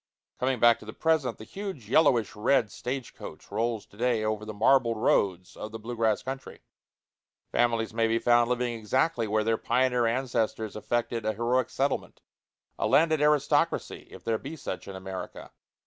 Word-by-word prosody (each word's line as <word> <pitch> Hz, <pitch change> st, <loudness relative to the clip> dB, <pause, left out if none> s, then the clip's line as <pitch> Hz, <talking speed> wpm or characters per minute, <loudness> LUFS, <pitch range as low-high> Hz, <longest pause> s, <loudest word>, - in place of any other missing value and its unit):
Coming 130 Hz, -1 st, 0 dB
back 120 Hz, 0 st, +5 dB
to -, -, -13 dB
the 110 Hz, -, -8 dB
present, 155 Hz, -7 st, +1 dB
the -, -, -10 dB
huge 190 Hz, -, -7 dB
yellowish 125 Hz, -3 st, +3 dB
red 105 Hz, 0 st, +2 dB
stage 130 Hz, 0 st, -5 dB
coach -, -, -11 dB
rolls 115 Hz, +1 st, -1 dB
to 100 Hz, -, -20 dB
day 120 Hz, -2 st, +1 dB
over 110 Hz, 0 st, -2 dB
the 110 Hz, -, -5 dB
marbled 115 Hz, +1 st, +3 dB
roads 95 Hz, -4 st, +1 dB
of 105 Hz, -, -7 dB
the 115 Hz, -, -6 dB
blue 115 Hz, +2 st, -6 dB
grass 110 Hz, -2 st, +1 dB
country. 135 Hz, +1 st, -7 dB, 0.9 s
Families 115 Hz, -2 st, +1 dB
may 115 Hz, 0 st, +2 dB
be 115 Hz, +1 st, +2 dB
found 120 Hz, 0 st, +3 dB
living 125 Hz, -1 st, 0 dB
exactly 115 Hz, +3 st, 0 dB
where 110 Hz, +1 st, +1 dB
their 115 Hz, 0 st, +1 dB
pioneer 125 Hz, -1 st, +2 dB
ancestors 115 Hz, -3 st, -1 dB
effected 115 Hz, +1 st, -2 dB
a 110 Hz, 0 st, 0 dB
heroic 120 Hz, +3 st, 0 dB
settlement 140 Hz, +1 st, -2 dB, 0.6 s
a -, -, +1 dB
landed 155 Hz, -1 st, +3 dB
aristocracy, 150 Hz, -1 st, +1 dB
if -, -, -12 dB
there 110 Hz, -1 st, 0 dB
be 145 Hz, +4 st, -7 dB
such 95 Hz, -, -6 dB
in 100 Hz, -, -7 dB
America. 95 Hz, 0 st, -7 dB
115 Hz, 175 wpm, -28 LUFS, 110-130 Hz, 0.9 s, back